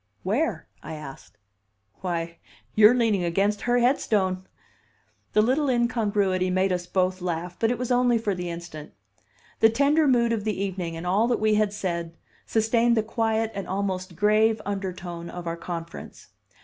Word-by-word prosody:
"Where?" 210 - -1
I 160 - -7
asked. 145 -3 -11 0.6
"Why 170 -2 -4 0.3
you're 215 +3 +7
leaning 220 -6 +2
against 195 +4 +1
her 245 - +4
headstone!" 205 -7 +1 0.9
The 215 - +4
little 270 +5 +1
incongruity 205 -6 +1
made 185 +1 +1
us 175 -1 -3
both 185 0 0
laugh, 175 0 -3
but 225 - +2
it 245 - 0
was 250 +1 -3
only 245 -1 +3
for 215 -3 -1
the 180 -1 -4
instant. 170 -3 -8 0.7
The 225 - +6
tender 285 +6 +3
mood 235 -3 +3
of 215 -3 -2
the 210 -3 -2
evening, 185 -4 -3
and 165 - -7
all 200 +6 +2
that 240 - +1
we 215 0 +2
had 210 -1 +2
said, 170 -4 -4 0.3
sustained 230 +1 +2
the 220 - +2
quiet 225 0 0
and 195 -1 -5
almost 185 -2 -3
grave 215 +3 +3
undertone 180 -4 -5
of 175 -1 -7
our 165 0 -2
conference. 170 -1 -8
200 Hz, 160 wpm, -25 LUFS, 180-225 Hz, 0.9 s, you're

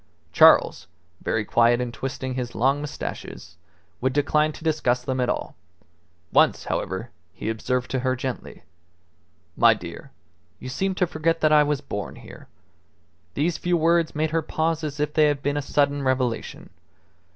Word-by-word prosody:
Charles, 90 - +5 0.4
very 115 -1 -1
quiet 120 +2 +3
and 125 -1 -3
twisting 130 0 -4
his 125 -2 -4
long 135 +4 +2
moustaches, 140 - -7 0.5
would 130 +1 0
decline 150 +2 +2
to - - -12
discuss 125 -6 +1
them 130 0 -2
at 125 - 0
all. - - -3 0.8
Once, - - +4
however, 95 +6 -3 0.2
he 110 - -3
observed 125 +3 -2
to 130 - 0
her 130 0 0
gently 130 -1 -6 0.9
"My - - +5
dear, - - -9 0.5
you 130 - -7
seem 190 +8 -1
to 180 - +2
forget 165 0 -1
that 155 0 +4
I 150 - +7
was 150 -2 0
born 100 0 -5
here." - - -13 0.9
These 160 +4 0
few 175 0 +1
words 165 0 +2
made 155 +1 0
her 165 0 +1
pause 160 +1 -1
as 150 -1 -4
if 150 0 -1
they 155 - +4
had 145 -2 -1
been 145 +1 0
a 145 - 0
sudden 140 0 +1
revelation. 130 -3 -2
140 Hz, 165 wpm, -24 LUFS, 125-155 Hz, 0.9 s, I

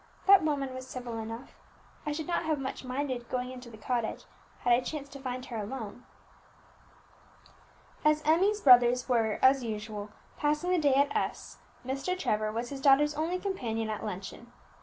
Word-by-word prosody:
"That 390 -1 +8
woman 280 -4 -1
was 260 0 -7
civil 245 -3 -5
enough; 225 +3 -7 0.5
I - - 0
should 305 +1 -3
not 350 - 0
have 315 -1 +1
much 270 -1 -5
minded 255 -2 -3
going 250 0 -2
into 250 -1 -9
the 220 - -12
cottage 235 0 -2 0.4
had 245 - +4
I 240 - +5
chanced 280 +1 -6
to 275 - -9
find 255 -1 -4
her 235 - -6
alone." 220 +1 -6 2.0
As 305 0 +3
Emmie's 385 +7 +3
brothers 245 -1 +6
were, 225 -4 +2
as 260 0 +6
usual, 210 -2 -5 0.3
passing 300 +4 0
the 365 - +3
day 285 -3 +3
at 280 +1 +2
S, - - -3 0.3
Mr. 275 +8 -2
Trevor 215 -10 0
was 235 +2 -3
his 275 -1 -6
daughter's 295 +1 +5
only 320 +4 -1
companion 230 - -2
at 215 - -4
luncheon. 210 +4 -7
255 Hz, 170 wpm, -30 LUFS, 235-295 Hz, 2.0 s, That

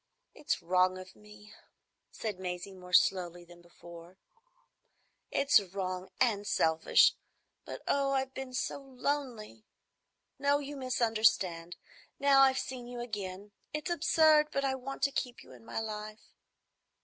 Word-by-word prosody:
"It's 285 - -3
wrong 185 +1 +2
of 185 0 -11
me," 210 0 -16 0.6
said 210 -4 -5
Maisie, 180 +1 -5
more 180 -1 -12
slowly 175 -2 +2
than 175 0 -16
before; 170 +1 -14 1.1
"it's 280 -4 +4
wrong 185 -1 -5
and 205 -5 +1
selfish; 160 0 +4 0.5
but, - - -8
oh, 275 -1 +1
I've 265 -1 -1
been 260 -1 -6
so 255 - -2
lonely! 260 -5 -4 0.8
No, 285 0 +3
you 290 0 -6
misunderstand. 220 -9 +1 0.4
Now 275 -1 +5
I've 265 -1 +5
seen 250 -2 -5
you 245 0 -7
again,—it's 205 - -6
absurd, 315 -2 +4
but 275 0 -1
I 265 - +1
want 265 +1 -6
to 280 - +3
keep 250 -2 -4
you 130 - -16
in 125 -3 -15
my 115 - -4
life." 215 -1 -7
215 Hz, 135 wpm, -31 LUFS, 185-265 Hz, 1.1 s, Now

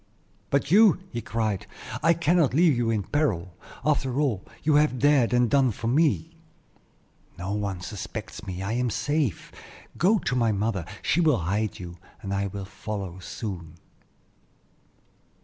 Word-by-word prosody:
"But 140 +1 0
you?" 210 +1 +7
he 120 - -3
cried; 110 -3 -2 0.3
"I 165 +1 +4
cannot 170 -4 +2
leave 165 -3 +5
you 120 -1 0
in 110 -3 0
peril, 95 - -1 0.3
after 140 -3 +1
all 125 -11 0 0.2
you 155 - +3
have 150 -4 +3
dared 140 -2 +4
and 125 0 +3
done 135 +2 +3
for 115 +1 -6
me." 160 +5 +2 1.0
"No 90 +3 -4
one 100 -3 -3
suspects 105 +4 -7
me; 95 0 -4
I 100 - -2
am 125 +1 0
safe. 145 - -1 0.5
Go 200 +6 +4
to 125 -9 -2
my 115 -3 +2
mother; 100 -3 -1 0.2
she 175 - +2
will 155 -6 +4
hide 100 +5 -1
you, 85 -1 -9 0.2
and 100 0 -3
I 100 0 0
will 100 0 -6
follow 100 -2 -6
soon." 90 -4 -6
115 Hz, 150 wpm, -26 LUFS, 100-145 Hz, 1.0 s, you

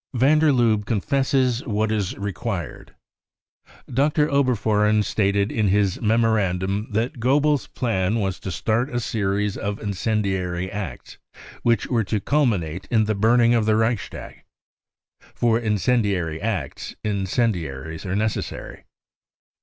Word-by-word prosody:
Van 140 +6 +4
der 155 -1 +4
Lubbe 115 -5 +2
Confesses 130 +3 +1
what 110 -1 0
is 105 -4 -1
Required. 100 -1 -5 0.9
Dr. 150 +4 +1
Oberfohren 110 -6 +2
stated 100 0 +1
in 110 -2 +1
his 100 -1 +1
memorandum 105 -3 +1
that 115 +4 -2
Goebbels 145 +3 +2
5 - - -37
plan 105 -5 0
was 95 -3 -2
to 95 - -5
start 115 - 0
a 120 - -2
series 105 -3 -1
of 100 +1 -3
incendiary 95 -3 -2
acts 95 -12 -7 0.4
which 115 -3 +2
were 115 -3 0
to 105 +2 -1
culminate 95 - 0
in 110 -2 +3
the 110 - 0
burning 115 +3 +4
of 115 -2 +2
the 110 - +4
Reichstag. 110 -1 -2 0.9
For 115 -1 +2
incendiary 105 -7 0
acts 110 -2 -4
incendiaries 90 - -2
are 95 -1 -3
necessary. 110 +1 -3
110 Hz, 125 wpm, -23 LUFS, 100-120 Hz, 0.9 s, Van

